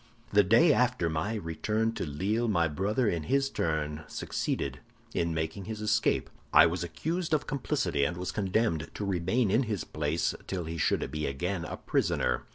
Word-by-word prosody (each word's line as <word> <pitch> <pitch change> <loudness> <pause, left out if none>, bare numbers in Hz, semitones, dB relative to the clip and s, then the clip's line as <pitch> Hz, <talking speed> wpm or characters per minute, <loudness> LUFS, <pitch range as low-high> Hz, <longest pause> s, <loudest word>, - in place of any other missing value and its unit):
"The 105 - +7
day 120 - +6
after 120 -9 +2
my 80 +8 -1
return 105 +5 -1
to 90 - -3
Lille, 100 +11 0
my 85 -6 +2
brother 100 - 0
in 85 -5 0
his 135 - +1
turn 75 -2 -1
succeeded 70 -2 -3 0.3
in 85 0 0
making 80 +4 -3
his 110 +1 -5
escape; 105 0 +1 0.2
I - - +8
was 85 +1 0
accused 160 - -1
of 150 - -1
complicity, 125 - 0
and 85 +5 0
was 90 0 -3
condemned 95 -5 0
to 105 - -3
remain 95 +4 +1
in 115 +5 +4
his 105 - -2
place 75 +2 -1
till 95 -2 -2
he 80 0 -5
should - - +1
be 75 0 -2
again 90 +6 -2
a - - -5
prisoner. - - 0
90 Hz, 175 wpm, -29 LUFS, 80-110 Hz, 0.3 s, I